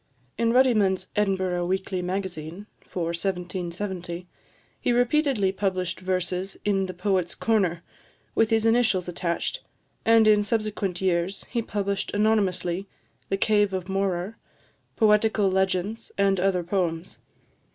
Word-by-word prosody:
In 230 0 +1
Ruddiman's 220 -7 +3
Edinburgh 190 -4 0
Weekly 190 0 -1
Magazine 180 -1 -4 0.2
for 180 - -3
1770, 180 0 -4 0.5
he - - 0
repeatedly 245 -4 +2
published 190 -2 -2
verses 185 +1 -2
in 195 -2 +1
the 185 - -5
Poet's 180 -1 0
Corner, 185 -7 +1 0.5
with 225 -1 +3
his 225 -1 +2
initials 225 -6 +3
attached, 175 - -2 0.4
and 225 -1 +5
in 210 -1 +6
subsequent 205 -4 -2
years 185 +1 0
he 235 - 0
published 200 -2 -2
anonymously 200 -3 +1 0.4
the 195 - +1
"Cave 205 -1 +2
of 185 -1 -3
Morar," 195 +1 -2 0.6
"Poetical 210 -2 +3
Legends," 190 +4 -1
and 195 -1 +3
other 185 -1 +1
poems. 175 -1 -2
195 Hz, 120 wpm, -25 LUFS, 180-210 Hz, 0.6 s, in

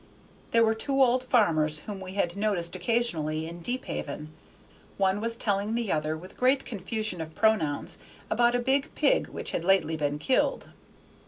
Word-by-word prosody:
There 230 0 +4
were 220 - +3
two 270 +5 -1
old 250 0 +3
farmers 160 - +2
whom 205 -2 -7
we 190 0 -8
had 175 -3 0
noticed 200 -4 0
occasionally 175 -7 0
in 170 +1 -7
Deephaven; 155 - -4 0.6
one 195 +1 +1
was 230 +1 -1
telling 205 0 0
the 235 -4 -1
other, 155 0 0
with 185 +4 -13
great 260 +2 +3
confusion 215 -3 -3
of 160 0 -7
pronouns, 205 -10 +1 0.3
about 240 +2 +3
a - - +2
big 270 +3 +1
pig - - +3
which - - -6
had - - -2
lately 185 -3 +3
been 145 -1 -1
killed. 255 - 0
200 Hz, 165 wpm, -28 LUFS, 160-235 Hz, 0.6 s, There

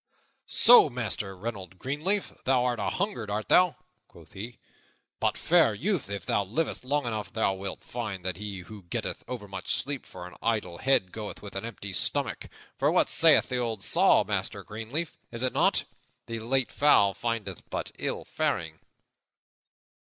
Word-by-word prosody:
"So, 240 -10 +8
Master 105 -6 -1
Reynold 95 -3 -6
Greenleaf, 155 - -2
thou 125 -1 +2
art 120 -2 0
anhungered, 150 - -2
art 105 +1 -3
thou?" 180 -3 +5 0.3
quoth - - -17
he. 115 +5 -7 0.6
"But, - - +1
fair 165 -10 +4
youth, 165 - -1
if 100 -1 -5
thou 100 - +1
livest 125 - -2
long 145 +1 0
enough, 105 -4 -3
thou 110 -4 +1
wilt 95 0 -6
find 105 -7 -5
that 90 -2 -2
he 100 -2 -6
who 105 +3 -11
getteth - - -3
overmuch 105 -6 -6
sleep 140 -2 -3
for 90 -1 -9
an 90 - -10
idle 105 -7 -1
head 130 -9 +2
goeth 105 -2 -7
with 100 - -9
an 100 - -3
empty 100 -4 -6
stomach. - - -1 0.3
For - - +3
what - - +3
sayeth - - +5
the 125 - -1
old 115 -5 -2
saw, - - +5
Master - - -2
Greenleaf? 115 +10 -4 0.2
Is 115 +1 -3
it 130 - +1
not - - +3 0.4
'The 115 -1 -5
late 125 +3 0
fowl 105 -9 +4
findeth 105 -3 -4
but - - -4
ill - - -3
faring'?" 80 -1 -2
110 Hz, 165 wpm, -28 LUFS, 100-130 Hz, 0.6 s, So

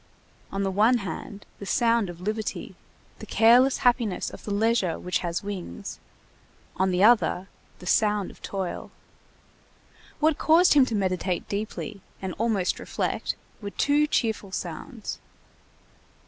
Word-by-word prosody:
On 195 0 -1
the 195 - 0
one 220 +6 +4
hand, 200 +2 -7
the 200 - -7
sound 230 -4 +2
of 175 -1 -9
liberty, 215 +2 -3 0.5
the - - -9
careless 245 +4 +5
happiness 235 -6 +2
of - - -11
the 210 - -5
leisure 205 -4 +1
which 180 - -1
has 170 +1 -3
wings; 190 - -6 0.8
on 190 +1 +2
the 180 +1 +2
other, 210 -4 +4 0.3
the - - -12
sound 210 +1 +2
of - - -19
toil. 190 -3 -4 1.3
What 310 -1 +2
caused 335 +3 +5
him 275 -3 +6
to 230 - -2
meditate 185 -2 -1
deeply, 210 0 -4 0.2
and 190 -2 -4
almost 215 -5 +1
reflect, - - -2 0.3
were 205 - -4
two 290 +7 +2
cheerful 220 -8 -1
sounds. 195 - -5
205 Hz, 135 wpm, -26 LUFS, 190-235 Hz, 1.3 s, him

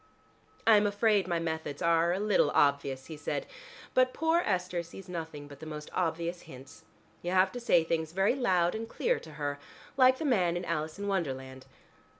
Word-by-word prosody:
"I 225 -2 +7
am 205 0 +3
afraid 205 -2 +2
my 170 -2 0
methods 160 -3 -3
are 170 0 +3
a 180 - 0
little 210 0 +3
obvious," 140 -2 +2
he 160 - -8
said, 155 - -3 0.5
"but 255 0 +3
poor 325 +2 +2
Esther 180 -2 -1
sees 180 +3 -11
nothing 160 -4 -6
but 145 -1 -12
the 160 - -9
most 150 -1 -7
obvious 170 0 -1
hints. 130 +1 -13 0.4
You 175 - -3
have 185 0 +4
to 245 - -6
say 205 -8 +3
things 160 -1 -2
very 195 +5 +2
loud 185 -10 +2
and 225 +1 -5
clear - - 0
to 155 - -12
her, 145 -1 -3 0.4
like 260 -1 +6
the 315 - -4
man 180 - +2
in 175 - -4
'Alice 155 0 -3
in 200 - -5
Wonderland.'" 130 -8 -3
170 Hz, 190 wpm, -30 LUFS, 155-205 Hz, 0.5 s, I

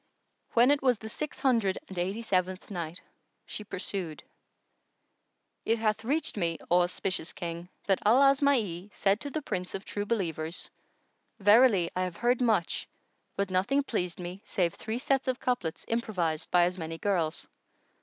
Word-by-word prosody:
When 240 +3 +6
it 290 - +3
was 255 -3 +3
the 220 +1 -8
Six 300 +7 -4
Hundred 225 -8 +2
and 190 - -9
Eighty 195 +6 -2
seventh 185 -1 -1
Night, 170 -2 -4 0.5
She 210 - -7
pursued, 185 -5 -2 1.4
It 225 - +2
hath 220 -1 0
reached 285 +1 -1
me, 170 -4 0
O 180 0 +6
auspicious 180 -1 -1
King, 170 0 -5 0.2
that 195 -2 +2
Al 225 +5 +5
Asma'i 260 - +3
said 200 +2 +1
to 285 - -5
the 305 +1 -4
Prince 180 -6 -3
of 195 - -6
True 205 0 -4
Believers, 170 -6 -2 0.7
"Verily 205 -3 +5
I 185 - 0
have 180 -2 -2
heard 245 +1 +2
much, 215 -8 +1 0.5
but 200 -1 -1
nothing 230 +10 +2
pleased 180 - -2
me 180 +2 -6
save 175 -3 0
three 220 +1 -4
sets 270 0 0
of 255 0 0
couplets 245 -11 -2
improvised 180 -9 -1
by 175 -1 +5
as 180 +1 0
many 165 0 -4
girls." 170 -4 -1
200 Hz, 160 wpm, -29 LUFS, 175-235 Hz, 1.4 s, When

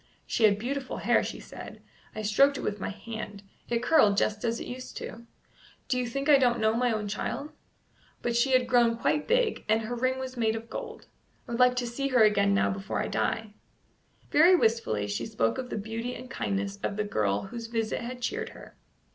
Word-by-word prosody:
"She 225 - +2
had 200 -2 +4
beautiful 260 +4 -3
hair," - - +3
she - - -5
said; - - -10 0.4
"I 215 - -4
stroked 275 +7 +4
it - - -5
with 210 0 -3
my - - -3
hand; 210 0 -7 0.3
it 235 0 0
curled 245 -8 +5
just 210 0 +1
as 230 0 0
it - - -6
used 255 +1 -7
to - - -4
do. 230 +1 -13 0.6
Do 255 - +1
you 250 - -1
think 275 +4 -3
I 290 -2 +7
don't 240 -2 +3
know 220 0 +3
my 245 +1 +1
own 215 -2 -2
child? 280 +8 -3 0.7
But 240 -1 0
she 260 +3 +3
had 255 -1 +4
grown 240 -2 +3
quite 295 +5 0
big, 480 -1 +1
and 220 +1 +3
her 230 +3 -4
ring 255 +2 0
was 260 0 -5
made 225 -2 +1
of 225 +1 -7
gold. - - -7 0.4
I - - -8
would 235 - -2
like 250 0 +5
to 250 -1 -1
see 275 +4 -2
her 250 -4 +4
again 200 -2 +4
now - - +2
before 195 +1 -3
I - - -1
die." 220 -2 -1 0.8
Very 340 +5 +7
wistfully 220 - +1
she 105 +3 -3
spoke 115 - 0
of 250 -1 -5
the - - -3
beauty 225 +4 -4
and 255 +1 -10
kindness 200 -3 -2
of 200 - -2
the 210 - +1
girl 105 - 0
whose 230 +2 -7
visit 225 -1 -2
had 250 +1 -6
cheered 445 - -2
her. - - -13
230 Hz, 220 wpm, -28 LUFS, 210-255 Hz, 0.8 s, I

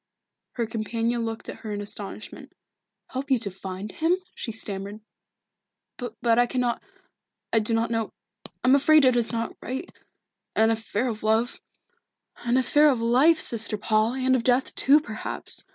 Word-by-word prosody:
Her 235 - -1
companion 230 +1 -2
looked 225 0 -5
at - - -7
her 215 - -7
in 205 - -3
astonishment. 205 0 -6 0.6
"Help 270 +2 -4
you 265 - +4
to 210 -4 -5
find 190 +2 -7
him?" 335 +3 +1 0.2
she 230 - -5
stammered. 205 -1 -4 1.0
"But 235 -1 0
I 245 - +4
cannot 245 -1 -1 0.7
I 225 - +5
do 220 +1 -1
not 230 +1 0
know 225 -2 -1 0.5
I - - 0
am - - +6
afraid 295 +1 +5
it 255 -1 +4
is 235 -2 +1
not 230 -1 -3
right 265 +8 -5 0.6
an 220 +1 +4
affair 225 +2 -2
of 220 -3 -4
love 220 +3 0 0.4
" - - -59
"An 240 +2 +3
affair 295 +3 +4
of 260 -4 +1
life, 260 +8 +4
Sister 220 -2 +3
Paul, 215 +3 +1
and 260 0 +2
of 245 - 0
death 250 +2 +2
too, 290 +3 +5
perhaps. 215 -6 -4
230 Hz, 170 wpm, -25 LUFS, 220-255 Hz, 1.0 s, am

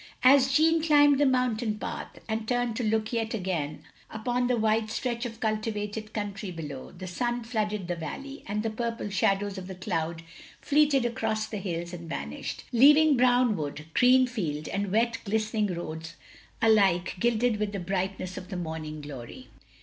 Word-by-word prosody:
As 270 +1 +6
Jeanne 320 +3 +4
climbed 290 -3 +5
the 290 - +4
mountain 245 -4 +1
path, - - -6
and 220 -1 -2
turned 245 -2 0
to 250 - -1
look 220 +1 0
yet 225 -1 -1
again 170 -7 -3 0.3
upon 245 +3 -1
the 250 -1 +1
wide 220 0 +1
stretch 240 +1 -2
of 225 -1 -10
cultivated 215 -1 -2
country 205 -2 -4
below, 150 -6 -7
the 185 +1 -9
stin 240 +6 -2
flooded 210 -4 -2
the 175 - -1
valley, 275 - -7
and 210 +1 -2
the 225 - -1
purple 230 -2 -3
shadows 195 +1 +1
of 185 - -8
the 190 - -7
cloud 170 -3 -3 0.4
fleeted 290 -3 +3
across 220 -2 -1
the 215 -1 -5
hills 175 -3 -4
and 170 -1 -8
vanished; 70 - -5
leaving 295 +5 +6
brown 245 -2 +4
wood, 150 -2 -5
green 255 +1 +6
field, 165 -12 -3
and 200 -1 -2
wet 230 +2 +1
glistening 215 0 0
roads 165 -2 -5 0.5
alike 195 -6 +4
gilded 235 +1 +2
with 210 -1 -1
the 200 - -4
brightness 190 0 -3
of 185 - -12
the 190 - -4
morning 160 -3 -5
glory. 145 - -9
215 Hz, 170 wpm, -28 LUFS, 185-240 Hz, 0.5 s, As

